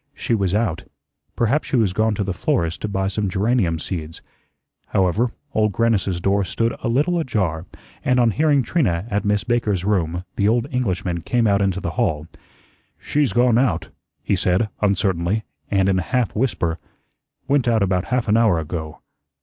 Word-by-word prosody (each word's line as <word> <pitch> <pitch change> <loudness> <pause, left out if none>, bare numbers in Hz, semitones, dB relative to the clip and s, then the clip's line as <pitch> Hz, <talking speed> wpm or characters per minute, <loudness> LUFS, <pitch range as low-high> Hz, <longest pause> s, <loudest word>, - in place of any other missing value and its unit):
She - - -2
was 100 -3 +1
out. 105 -6 -1 0.5
Perhaps 120 +6 +1
she - - -1
was 110 -7 +2
gone 110 +1 +1
to 100 - -1
the 95 -1 -2
florist's 85 -1 -1
to - - -3
buy 95 -1 -1
some 100 0 -1
geranium 100 -3 +1
seeds. 80 -1 -6 0.6
However, 100 +6 +1 0.2
Old 105 -1 +1
Grannis's 100 -6 +1
door 100 +3 +1
stood 115 +4 -1
a - - -2
little 150 +9 +1
ajar, 95 - -1 0.4
and 125 0 +2
on 120 -2 +4
hearing 145 +2 +2
Trina 105 - 0
at 100 0 0
Miss 105 0 +1
Baker's 105 -6 0
room, 90 -4 0
the 100 - +2
old 115 +2 +2
Englishman 95 -8 -1
came 120 +6 +1
out 100 -2 +3
into 95 -1 0
the - - -3
hall. 75 -1 0 0.7
"She's 145 -2 0
gone 120 -1 +3
out," 130 0 0 0.3
he - - +1
said, 95 +4 +1
uncertainly, 100 0 +1 0.3
and 95 -1 +2
in 95 -1 +2
a - - 0
half 120 +6 -1
whisper, 95 -9 -1 0.7
"went 140 -3 +2
out 115 -3 +3
about 90 -1 0
half 125 -2 -1
an 105 - +3
hour 110 -7 +4
ago. 80 -1 -5
100 Hz, 175 wpm, -21 LUFS, 90-115 Hz, 0.7 s, on